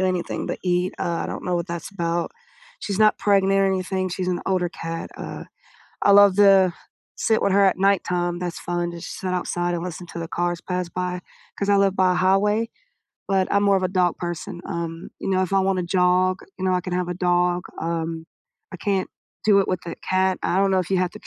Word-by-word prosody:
do 185 - +2
anything 175 -1 -3
but - - -4 0.2
eat, 180 +1 -1
uh, 170 -1 -1
I - - -3
don’t - - -6
know 180 -1 +1
what 170 - -3
that’s 170 +2 -5
about, 170 0 0 0.6
she’s 200 -1 -2
not 215 - +3
pregnant 195 -1 +4
or 195 - +3
anything, 185 0 -1
she’s 185 0 -3
an - - -4
older 180 -2 +1 0.2
cat, 165 0 -4 0.2
uh, - - -7 0.6
I - - +4
love 200 -2 +6
to 190 -2 +6 0.5
sit 220 -1 +3
with 195 - +2
her 200 - +6
at 185 - -7
nighttime, 175 -3 +1
that’s 175 -1 -4
fun, 175 0 -1
just 170 - -7
sit 185 -1 -2
outside 175 0 -2
and 170 +1 -3
listen 180 0 -6
to 170 - -7
the 165 -1 -5
cars 175 -1 0
pass 180 -1 -1
by, 180 +1 -3 0.5
cause 200 - -1
I 200 - +5
live 195 -1 +3
by 185 -1 +4
a 180 - 0
highway, 205 +3 +3 0.7
but 190 -1 +3
I’m 200 - +4
more 195 - +5
of - - -2
a 185 - -8
dog 175 - +3
person, 175 -1 -4 0.2
um, 165 0 -5
you - - -1
know, 185 0 +2
if 195 - -12
I 195 - +4
wanna 190 -2 0
jog, 180 +1 +3 0.2
you 190 - -3
know, 185 -1 +2
I 180 - +1
could 180 0 -2
have 180 - -3
a 180 - -2 0.2
dog, 175 0 +2 0.3
um, 165 -1 -3 0.5
I - - -5
can’t 195 -2 +1 0.4
do 200 - +7
it - - 0
with 185 -1 -1
a - - -5
cat. 185 0 +3 0.2
I - - +1
don’t 195 0 +3
know 185 - +3
if - - -13
you 185 - +3
have 180 - -6
to - - -13
180 Hz, 235 wpm, -23 LUFS, 175-190 Hz, 0.7 s, do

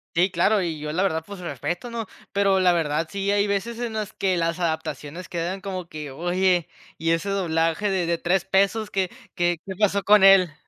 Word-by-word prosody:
Sí, 180 +3 +3
claro, 190 +4 +2
y 165 -3 -2
yo 150 0 -4
la 180 - 0
verdad, 160 -5 0
pues 200 -2 -9
respeto, 175 - -4
¿no? 230 -2 -4 0.3
Pero 195 -1 +3
la 180 -1 +4
verdad, 160 -1 0
sí, 200 0 -1
hay 205 0 +2
veces 215 +4 -2
en 235 -2 -3
las 215 -1 -4
que 190 -2 0
las 165 +1 -1
adaptaciones 160 0 -3
quedan 175 +3 -3
como 185 -3 -5
que: 150 -3 -7
“Oye, 175 +3 +1 0.3
¿y 165 +1 +1
ese 165 +4 0
doblaje 165 0 0
de 185 -3 0
de 170 0 0
3 180 +2 +1
pesos, 200 +2 +1
qué 190 -2 0 0.2
qué 175 -1 +1
qué 190 -1 -6
pasó 200 -1 +1
con 210 -1 +6
él?”. 190 -4 +7
185 Hz, 210 wpm, -24 LUFS, 165-200 Hz, 0.3 s, él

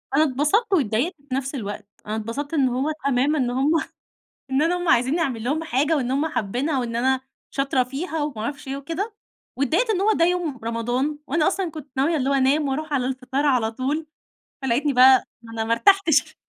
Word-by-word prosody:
أنا 310 - +5
اتبسطت 315 - +1
واتضايقت 275 - +1
في 255 - -1
نفس 270 +1 -3
الوقت، 210 -4 -5 0.2
أنا 215 - -2
اتبسطت 230 +8 -4
إن 275 -4 +3
هو 260 +5 -1
تمامًا 280 +3 +2
إن 250 -3 +1
هُم 265 +5 +1 0.8
إن 265 +3 +2
أنا 345 +2 +2
هُم 350 -1 -3
عايزيني 260 +8 +3
أعمل 245 -8 -2
لهُم 305 +6 -1
حاجة 300 +2 +1
وإن 255 -3 -1
هُم 285 +4 +1
حابينها 260 +4 -1
وإن 235 -1 -3
أنا 260 +2 +2 0.3
شاطرة 275 -2 +1
فيها 300 +5 -4
وما 285 -7 -4
أعرفش 285 +3 -5
إيه 270 - -3
وكده، 335 +10 -4 0.4
واتضايقت 325 - +1
إن 375 - +1
هو 430 +2 +3
ده 335 - +3
يوم 345 -6 0
رمضان 245 +6 -1
وأنا 305 +2 +1
أصلًا 380 -3 -1
كنت 300 -2 -10
ناوية 295 +5 +2
اللي 270 -2 0
هو 280 - +2
أنام 275 +2 +2
واروح 305 +3 -3
على 255 -3 +1
الفطار 265 +2 -2
على 245 -5 +2
طول، 285 +7 -2 0.6
فلقيتني 270 +3 +1
بقى 260 0 +7 0.3
أنا 225 -1 -2
ما 230 +1 +1
ارتاحتش. 320 +4 +3
275 Hz, 195 wpm, -23 LUFS, 255-315 Hz, 0.8 s, بقى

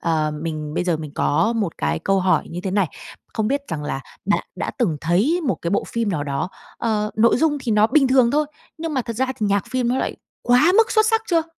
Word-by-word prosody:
ờ, 160 -2 0
mình 155 -2 -4
bây 175 - 0
giờ 175 -3 +1
mình 155 -1 -7
có 220 +10 +2
một 200 -7 -2
cái 75 +1 0
câu 195 - +1
hỏi 185 0 +2
như 175 - -5
thế 190 - -3
này: 195 -3 +1 0.5
Không 215 -1 0
biết 280 +3 0
rằng 155 -3 -3
là 135 -2 -3 0.2
bạn - - +1
đã - - -2
từng 200 - +1
thấy 200 - +2
một 250 - +2
cái 170 - -1
bộ 200 - +1
phim 230 -2 -2
nào 160 -7 -1
đó, 140 +3 -2 0.3
ờ, 210 -2 0
nội 230 +2 +4
dung 295 +1 +2
thì 245 -4 -1
nó 210 0 +5
bình 270 +3 +3
thường 255 -2 +4
thôi, 300 +2 +1 0.3
nhưng 320 -1 -3
mà 260 - +1
thật 230 -1 -6
ra 260 +3 +1
thì 215 - -1
nhạc 200 -1 +1
phim 255 -2 0
nó 250 - +1
lại - - -2 0.3
quá 250 +8 +4
mức 450 +1 +5
xuất 435 -1 +4
sắc 450 0 +3
chưa? 335 -2 +2
215 Hz, 255 wpm, -21 LUFS, 170-260 Hz, 0.5 s, nó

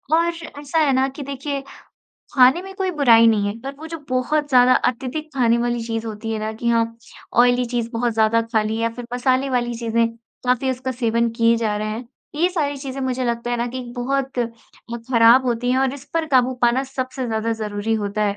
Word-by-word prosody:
और 335 +1 +2 0.3
ऐसा 290 +3 -1
है 295 -3 +3
ना 260 +1 +2
कि 275 +2 -8
देखिए, 275 +1 -4 0.7
खाने 265 +5 +5
में 385 0 -10
कोई 380 -1 -1
बुराई 240 -8 +5
नहीं 215 -3 +3
है, 205 +2 -4
पर 270 +3 -6
वो 315 - -8
जो 330 0 -6
बहुत 285 +4 0
ज़्यादा 255 -2 +5
अत्यधिक 265 +6 -1
खाने 235 -3 +3
वाली 240 0 -1
चीज़ 225 0 -3
होती 225 +1 -5
है 220 - -2
ना 215 +1 -3
कि 230 +2 -3
हाँ, 230 0 +1 0.4
ऑयली 245 +1 +4
चीज़ 235 -1 -2
बहुत 235 0 0
ज़्यादा 225 +1 +3
खा 225 -1 0
ली 215 +1 -2
है 225 - -2
या 230 - +2
फ़िर 245 -1 -7
मसाले 255 +2 +1
वाली 240 -1 0
चीज़ें, 230 0 0 0.4
काफ़ी 250 +1 +2
उसका 260 +1 -3
सेवन 235 -1 +1
किए 230 0 +4
जा 220 -2 -1
रहे 215 +1 -3
हैं। 225 +3 -5 0.3
ये 335 +4 +2
सारी 295 -5 -1
चीज़ें 270 -1 -6
मुझे 260 -1 -1
लगता 235 0 -2
है 240 - 0
ना 235 0 -1
कि 255 +2 -5 0.2
बहुत 270 +1 -2 0.5
म 235 - -3
ख़राब 235 +1 +6
होती 245 0 0
हैं 260 - +2
और 265 -1 +1
इस 280 -1 -11
पर 330 -1 +1
क़ाबू 260 -2 +3
पाना 240 +2 +3
सबसे 260 -1 -4
ज़्यादा 225 0 -1
ज़रूरी 215 0 -3
होता 210 -1 -2
है। 205 -1 0
245 Hz, 220 wpm, -21 LUFS, 230-265 Hz, 0.7 s, ख़राब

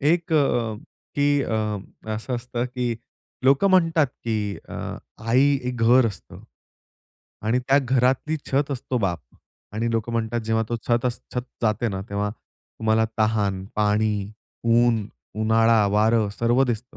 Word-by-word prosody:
एक 165 +4 +1
अ, 120 -7 +2 0.4
की 145 0 +2
अ, 120 - -3 0.6
असं 115 +4 -4
असतं 120 0 -3
की 125 -2 -1 0.5
लोक 135 +6 +4
म्हणतात 165 -6 +4 0.2
की 105 -3 -1
अ, - - -8 0.5
आई 140 +4 +4
एक 125 0 -3
घर 120 +1 +6
असतं 100 -6 -7 1.0
आणि 110 +4 +1
त्या 135 +3 +3
घरातली 130 +3 +1
छत 140 +2 +1
असतो 130 -1 -2
बाप 90 -6 -1 0.5
आणि 115 +2 -1
लोकं 115 +1 -1
म्हणतात 115 0 -1
जेव्हा 110 0 +1
तो 120 - -1
छत 120 0 +2
अस 125 0 -2
छत 125 - +1 0.2
जाते 115 +2 +1
ना, 95 -2 -4
तेव्हा 100 +1 -1
तुम्हाला 110 +1 -2
तहान, 105 -3 +1
पाणी, 105 -1 +1 0.4
ऊन, 115 -2 +3 0.3
उन्हाळा, 115 -1 +4
वारं 105 +2 +3
सर्व 120 +5 +2
दिसतं. 120 0 -4
115 Hz, 140 wpm, -24 LUFS, 110-130 Hz, 1.0 s, घर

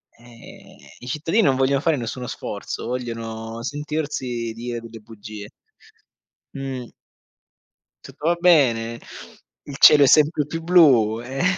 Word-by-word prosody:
Ehm, 120 0 -16 0.2
i 125 - -12
cittadini 165 - 0
non 135 -7 +3
vogliono 135 +1 +1
fare 165 0 +1
nessuno 125 +1 -5
sforzo, 105 -3 -6
vogliono 115 -2 -6
sentirsi 140 -5 -4
dire 120 +1 -6
delle 115 -1 -11
bugie. 105 -1 -11 1.0
Mh. 135 -3 -6 1.2
Tutto 150 - -7
va 170 - +3
bene, 125 -10 +2 0.6
il 140 - -9
cielo 145 -1 +8
è - - +5
sempre 150 +1 +4
più 165 +3 -6
blu. 135 -11 +4
Ehm 130 +5 -4
125 Hz, 125 wpm, -22 LUFS, 115-150 Hz, 1.2 s, cielo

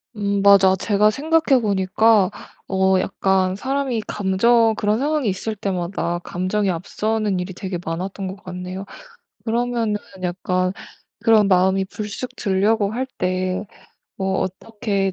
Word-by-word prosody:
음 200 -1 0
맞아. 195 -1 +6
제가 210 +2 +2
생각해 305 -2 +2
보니까 200 0 +3 0.4
어 190 -1 +2
약간 190 -1 +1
사람이 260 +1 -1
감정 220 +4 +3
그런 210 +1 +1
상황이 295 -2 0
있을 200 +3 -3
때마다 180 -3 -2
감정이 185 +3 -1
앞서는 210 +3 -1
일이 180 +1 -4
되게 185 -1 -4
많았던 185 +4 -4
것 195 +2 -8
같네요. 185 +1 -6 0.6
그러면은 235 -1 0 0.3
약간 185 +1 -1 0.5
그런 220 -3 +5
마음이 190 0 +3
불쑥 210 +5 -6
들려고 200 +1 +1
할 250 +4 -2
때 185 +1 -1 0.5
뭐 190 -1 -1
어떻게 200 0 -2
195 Hz, 270 characters per minute, -21 LUFS, 185-220 Hz, 0.6 s, 맞아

